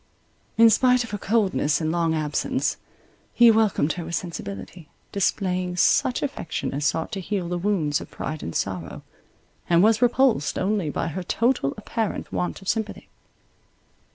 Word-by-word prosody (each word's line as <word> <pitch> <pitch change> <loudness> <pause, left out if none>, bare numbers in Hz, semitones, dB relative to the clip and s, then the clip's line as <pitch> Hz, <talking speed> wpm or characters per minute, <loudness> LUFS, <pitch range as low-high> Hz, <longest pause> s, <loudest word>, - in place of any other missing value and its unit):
In 230 0 +7
spite 250 +2 +4
of 230 - -9
her 205 - -4
coldness 195 -9 +1
and 160 -1 -1
long 165 -1 +1
absence, 150 -1 -1 0.6
he 235 -1 +7
welcomed 215 -8 +2
her 175 -2 -6
with 170 +1 -3
sensibility, 160 - -6 0.2
displaying 185 -2 -1
such 245 +7 +3
affection 285 -11 -3
as 145 +1 0
sought 160 +6 -1
to 200 - -3
heal 190 -1 -3
the 175 0 -2
wounds 170 -7 0
of - - -10
pride 155 0 -5
and 85 - -6
sorrow, 95 -4 -3 0.7
and 170 +1 +5
was 220 +1 +4
repulsed 245 - +2
only 195 -4 0
by 165 +3 -2
her 185 +4 -4
total 230 - 0
apparent 215 0 -3
want 180 +2 -3
of - - -13
sympathy. 220 0 -3
185 Hz, 155 wpm, -24 LUFS, 160-220 Hz, 0.7 s, In